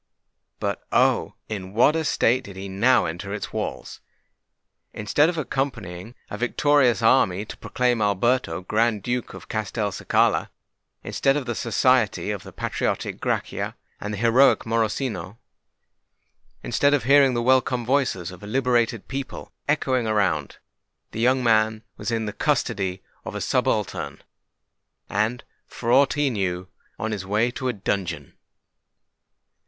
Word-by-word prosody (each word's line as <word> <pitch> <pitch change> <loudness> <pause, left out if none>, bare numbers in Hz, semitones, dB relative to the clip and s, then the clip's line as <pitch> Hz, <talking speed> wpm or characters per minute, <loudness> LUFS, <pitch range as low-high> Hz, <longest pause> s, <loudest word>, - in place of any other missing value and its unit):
But, - - -2
oh! - - +2
in 95 -3 -6
what 125 +7 +5
a 160 - 0
state 130 -3 +2
did 100 - -10
he 95 +1 -6
now 115 +6 +3
enter 90 +5 -4
its 105 - -6
walls! - - -5 0.9
Instead 145 +9 +2
of 175 - -3
accompanying 120 - -3
a 105 - -7
victorious 125 -1 +3
army 105 -5 +3
to - - -8
proclaim 125 -2 0
Alberto 105 -2 +1
Grand 110 +2 +1
Duke 125 +1 -3
of - - -11
Castelcicala,—instead 110 +5 -1
of 140 - -3
the 120 - -2
society 115 -1 +2
of 100 -3 -4
the 95 -1 -11
patriotic - - -2
Grachia - - -2 0.2
and 105 - -5
the 105 - -4
heroic 120 +5 +4
Morosino,—instead 115 +4 -4
of 135 - -1
hearing 135 0 +5
the 120 - 0
welcome 125 -1 +2
voices 120 -9 0
of 90 - -12
a 105 - -9
liberated 120 -2 +1
people 135 0 -6
echoing 130 -5 +1
around,—the 100 0 -3
young 130 +2 +3
man 110 -1 +2
was - - -4
in 115 -1 -1
the 105 - -4
custody 95 -2 -1 0.2
of - - -7
a - - -2
subaltern, - - -1 0.9
and, 110 +4 0 0.2
for 120 0 -3
aught 135 +2 +5
he 145 -2 +1
knew, 95 -4 -2 0.3
on 110 - -3
his 100 -3 -3
way 105 +5 +1
to 130 +1 -4
a 125 - 0
dungeon! 90 - -3
115 Hz, 135 wpm, -24 LUFS, 100-130 Hz, 0.9 s, what